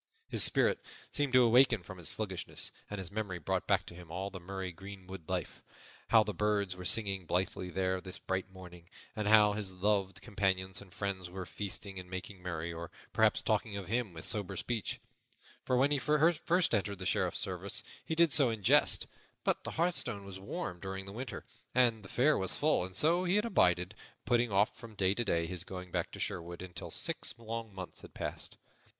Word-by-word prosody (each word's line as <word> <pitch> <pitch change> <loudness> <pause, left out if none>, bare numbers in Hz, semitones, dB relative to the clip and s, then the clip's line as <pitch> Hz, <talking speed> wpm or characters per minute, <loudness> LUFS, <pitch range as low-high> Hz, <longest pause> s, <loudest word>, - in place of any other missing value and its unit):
His - - +6
spirit - - +4 0.3
seemed 145 -3 +1
to 125 0 +7
awaken 120 -3 +5
from 95 +1 -10
its 80 -3 +2
sluggishness, 95 -4 -1 0.2
and 105 - -4
his 95 -2 -6
memory 100 -3 -3
brought 80 - -2
back - - +3
to - - -10
him 85 -1 -12
all 95 +3 -3
the 95 - -7
merry 95 +1 -5
greenwood 95 -1 -10
life - - -3 0.5
how 110 -2 +6
the 105 0 -4
birds 105 -3 0
were 90 0 -8
singing 95 -1 +1
blithely 90 0 -1
there 95 0 0
this 95 -1 -4
bright 95 0 -3
morning, 90 -2 -12 0.3
and 105 -2 -2
how 105 -1 +7
his 100 -3 -5
loved 95 0 +1
companions 95 -3 -1
and 100 -3 -14
friends 95 -2 -3
were 90 0 -6
feasting 100 +1 -4
and 90 0 -10
making 95 +1 -6
merry, 85 -2 -4
or 85 0 -6 0.2
perhaps - - +3
talking 100 -2 0
of 95 -2 -7
him 115 -2 0
with 80 -2 -8
sober 105 -4 -1
speech; 115 -4 -2 0.7
for 125 - +2
when 135 +3 +4
he 145 - +3
first 165 +4 +2
entered 100 -1 +1
the 95 - -7
Sheriff's - - +1
service - - -2 0.2
he 160 - -3
did 165 -3 +5
so 140 -5 +5
in 110 -3 -4
jest; - - +6 0.4
but - - +1
the - - -4
hearthstone 160 - 0
was 95 -1 -8
warm 90 -2 -5
during 95 +1 -5
the 100 - -8
winter, 125 +2 -6 0.3
and 120 -3 +4
the 95 - -12
fare 145 +4 +3
was 95 -1 0
full, 150 -9 +3
and 95 0 -6
so 165 - +4
he 180 +2 +2
had 210 +2 +3
abided, 90 - +3 0.3
putting 120 -2 +2
off 100 +2 +3
from 115 -2 -12
day 95 -1 +3
to 120 - 0
day 85 -6 +1
his 90 +1 -2
going 90 -1 -8
back - - -1
to - - -9
Sherwood, 85 +1 -4
until 90 -1 -7
six - - -1
long 115 -1 -5
months 95 -2 -8
had - - -13
passed. - - -4
95 Hz, 205 wpm, -33 LUFS, 90-115 Hz, 0.7 s, to